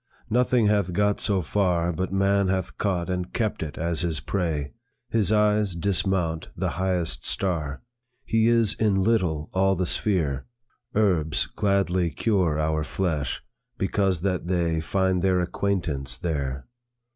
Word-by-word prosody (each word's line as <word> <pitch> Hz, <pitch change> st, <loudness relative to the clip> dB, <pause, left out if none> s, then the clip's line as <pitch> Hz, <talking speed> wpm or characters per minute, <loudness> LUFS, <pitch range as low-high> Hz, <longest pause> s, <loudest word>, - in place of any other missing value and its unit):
"Nothing 125 Hz, 0 st, +3 dB
hath 100 Hz, -4 st, +2 dB
got 105 Hz, +2 st, +2 dB
so 100 Hz, -3 st, +1 dB
far 90 Hz, -1 st, +1 dB
But 95 Hz, +3 st, -3 dB
man 100 Hz, 0 st, +2 dB
hath 95 Hz, -1 st, -2 dB
caught 90 Hz, -4 st, 0 dB
and 90 Hz, -1 st, -3 dB
kept 110 Hz, -3 st, -1 dB
it 80 Hz, -2 st, -5 dB
as 85 Hz, 0 st, -1 dB
his 85 Hz, -3 st, -1 dB
prey; 80 Hz, -3 st, -2 dB, 0.4 s
His 110 Hz, -3 st, +2 dB
eyes 105 Hz, -3 st, +2 dB
dismount 85 Hz, -2 st, 0 dB
the -, -, 0 dB
highest 90 Hz, -2 st, -1 dB
star; 80 Hz, -7 st, -2 dB, 0.4 s
He 110 Hz, 0 st, +2 dB
is 115 Hz, -3 st, +3 dB
in 100 Hz, -3 st, +1 dB
little 90 Hz, -9 st, +1 dB
all 95 Hz, +1 st, +3 dB
the 90 Hz, 0 st, 0 dB
sphere. 80 Hz, -9 st, 0 dB, 0.5 s
Herbs 85 Hz, -8 st, +2 dB
gladly 95 Hz, -3 st, +1 dB
cure 90 Hz, -1 st, +1 dB
our 80 Hz, 0 st, 0 dB
flesh, 80 Hz, -4 st, -2 dB, 0.3 s
because 95 Hz, -3 st, 0 dB
that 90 Hz, -2 st, -1 dB
they 85 Hz, -3 st, +1 dB
Find 95 Hz, +1 st, +1 dB
their 95 Hz, -1 st, +2 dB
acquaintance 85 Hz, -8 st, -2 dB
there. 70 Hz, -4 st, -3 dB
90 Hz, 140 wpm, -25 LUFS, 80-100 Hz, 0.5 s, Nothing